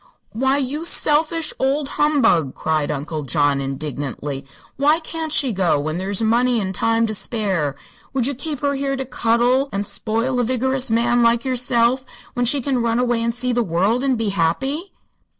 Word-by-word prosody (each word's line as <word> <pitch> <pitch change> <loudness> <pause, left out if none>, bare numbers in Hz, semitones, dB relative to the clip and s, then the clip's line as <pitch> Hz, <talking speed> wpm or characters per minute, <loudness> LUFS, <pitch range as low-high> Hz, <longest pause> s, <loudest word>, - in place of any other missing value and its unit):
"Why, 265 +5 +1
you 285 +3 -2
selfish 315 0 +2
old 275 +2 0
humbug!" 230 - +2
cried 155 -2 -1
Uncle 150 +2 -3
John, 140 +1 +1
indignantly. 140 0 -5 0.3
"Why 295 +4 +3
can't 320 -1 -5
she 270 -5 +1
go, 180 -6 +2
when 155 +4 -3
there's 195 +3 0
money 240 +2 +2
and 190 -2 -2
time 225 +4 +1
to 215 - -3
spare? 195 - -1 0.4
Would 260 -3 0
you 280 - 0
keep 290 +1 -5
her 285 -1 +1
here 275 0 -1
to 265 0 -4
cuddle 245 +2 +1
and 200 +1 -2
spoil 230 +5 -1
a - - +2
vigorous 260 +2 0
man 240 +2 +2
like 235 +1 +3
yourself, 250 0 +1 0.3
when 245 0 0
she 275 +3 +2
can 255 -1 0
run 230 0 +1
away 240 -2 +1
and 230 0 -1
see 250 0 -1
the 240 - +2
world 200 +6 +1
and 265 -3 +1
be 225 -2 -1
happy?" 265 - -1
235 Hz, 180 wpm, -20 LUFS, 195-265 Hz, 0.4 s, Why